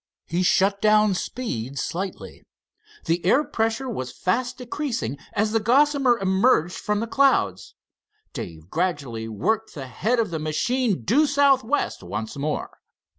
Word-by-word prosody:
He 175 +2 -1
shut 195 +2 +2
down 215 -1 +4
speed 140 - -4
slightly. 185 +8 -5 0.6
The 170 +1 0
air 260 +11 +4
pressure 225 +1 -1
was 130 - -4
fast 245 +7 -1
decreasing 240 - -3
as 215 +1 +1
the 225 - +2
Gossamer 265 +2 +3
emerged 190 -2 +2
from 210 0 -2
the - - -1
clouds. 230 - +1 0.6
Dave 80 -1 -7
gradually 145 -10 -2
worked 215 - -1
the 135 -3 -6
head 215 - -1
of 220 -5 0
the 160 - -2
machine 195 - 0
due 285 - +3
southwest 280 -2 +2
once 105 +5 -5
more. 145 +2 -4
205 Hz, 135 wpm, -24 LUFS, 150-245 Hz, 0.6 s, down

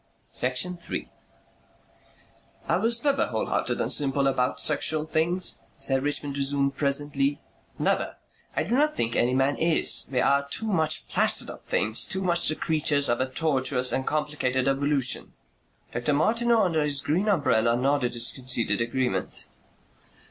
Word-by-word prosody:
Section 130 +9 +1
3 170 - -6 1.6
"I - - +2
was 230 +1 0
never 285 -1 +1
wholehearted - - -2
and - - +1
simple 140 -1 +2
about 130 -2 0
sexual 155 +1 +1
things," 170 +3 0 0.2
Sir 135 -1 +2
Richmond 145 0 -3
resumed 140 0 +1
presently. 140 0 0 0.4
"Never. - - -1 0.4
I - - 0
do 195 +9 -4
not 300 +4 +2
think 115 0 -1
any 125 +2 +1
man 135 +2 +1
is. 165 -1 +2
We 130 - 0
are 140 +1 +2
too 220 - -2
much 160 -7 0
plastered - - +1
up - - -14
things, 110 +2 +1
too 190 0 -2
much 175 -1 +2
the 155 - +1
creatures 150 -3 +2
of 120 +1 0
a 130 - -2
tortuous 130 -3 +1
and 130 - -2
complicated 145 -4 -1
evolution." 135 -1 0 0.6
Dr. 120 +5 -1
Martineau, 230 +8 +2
under 165 -4 0
his 145 -2 +1
green 170 +9 -1
umbrella, 120 - +2
nodded 130 -1 0
his 120 0 +4
conceded 120 -5 0
agreement. 125 +2 -3
140 Hz, 150 wpm, -25 LUFS, 130-160 Hz, 1.6 s, his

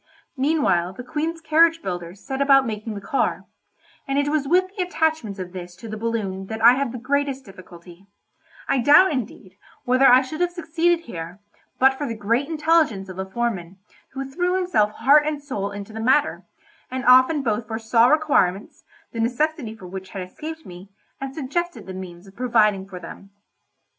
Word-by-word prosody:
Meanwhile 260 - +1
the 250 - -9
Queen's 320 +6 -3
carriage 325 +1 +3
builders 175 +1 -6
set 265 0 -3
about 275 -1 +5
making 215 -1 -5
the 200 - -6
car, 275 +6 -1 0.6
and 275 0 -1
it 285 0 +1
was 295 -2 0
with 370 +4 +2
the 390 - -2
attachments 320 - -1
of 180 -1 -7
this 175 -1 -8
to 225 - -11
the 215 - -5
balloon 210 -4 -3
that 220 +1 -5
I 235 +2 +7
had 270 -2 -1
the 250 - -6
greatest 275 +2 -1
difficulty; 180 -1 -14 0.6
I 270 - +1
doubt, 295 +9 +6
indeed, 225 -8 -6 0.3
whether 255 +2 +4
I 255 +2 +7
should 310 +6 -6
have 355 - +2
succeeded 340 0 0
here, 175 - -8 0.4
but 265 +1 +5
for 285 +2 -4
the 230 -2 -5
great 230 +7 0
intelligence 310 - +1
of 185 0 -8
a 190 0 -4
foreman, 190 -5 -3 0.4
who 270 0 -4
threw 355 +7 -1
himself 355 - +2
heart 295 +5 +4
and 305 -1 -2
soul 255 -9 -4
into 205 +1 -8
the 220 - -6
matter, 265 +6 +1 0.4
and 255 0 -4
often 255 +4 +5
both 225 -2 -1
foresaw 225 +1 +2
requirements, 250 - +1 0.3
the 230 - -6
necessity 245 0 -1
for 195 - -13
which 190 +1 -8
had 190 -1 -5
escaped 320 - -8
me, 180 +2 -11 0.3
and 270 0 -6
suggested 345 +5 -3
the 190 - -7
means 180 -1 -9
of 195 0 -16
providing 215 -5 +2
for 180 -2 -8
them. 180 +3 -11
245 Hz, 185 wpm, -23 LUFS, 195-295 Hz, 0.6 s, I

